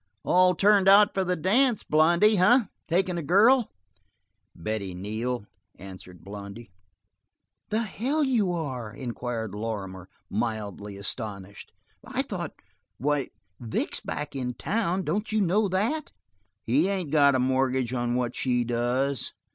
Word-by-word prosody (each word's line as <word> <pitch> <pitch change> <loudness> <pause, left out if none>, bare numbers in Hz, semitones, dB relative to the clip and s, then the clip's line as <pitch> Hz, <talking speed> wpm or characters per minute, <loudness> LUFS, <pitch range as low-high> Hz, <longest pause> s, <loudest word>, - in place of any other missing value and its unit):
"All 180 0 +4
turned 200 +1 +4
out 205 +2 +7
for 190 - 0
the 180 0 0
dance, 220 - +2
Blondy, 170 +7 +4
eh? 240 +8 +5 0.2
Takin' 180 0 0
a - - -3
girl?" 215 - +4 0.9
"Betty 95 +1 -4
Neal," 110 +5 -3 0.3
answered 95 -2 -11
Blondy. 100 +2 -9 1.0
"The 220 +2 0
hell 260 +9 -1
you 230 -9 +1
are!" 130 -10 -4
inquired 115 -3 -5
Lorrimer, 100 -4 -5 0.2
mildly 105 -2 -4
astonished. 100 -1 -6 0.3
"I - - -2
thought - - -5 0.4
why, 145 0 0 0.3
Vic's 115 -3 -3
back 145 -1 -5
in 125 -2 -3
town, 190 -4 -1
don't 210 +4 -2
you 215 - +1
know 200 +2 +2
that?" 220 +12 -1 0.5
"He 140 +10 +2
ain't 185 -7 -2
got 140 -3 +5
a - - +2
mortgage 130 -1 +1
on 120 -1 -1
what 125 -1 -1
she 125 -2 0
does." 120 +2 -1
135 Hz, 130 wpm, -26 LUFS, -, 1.0 s, out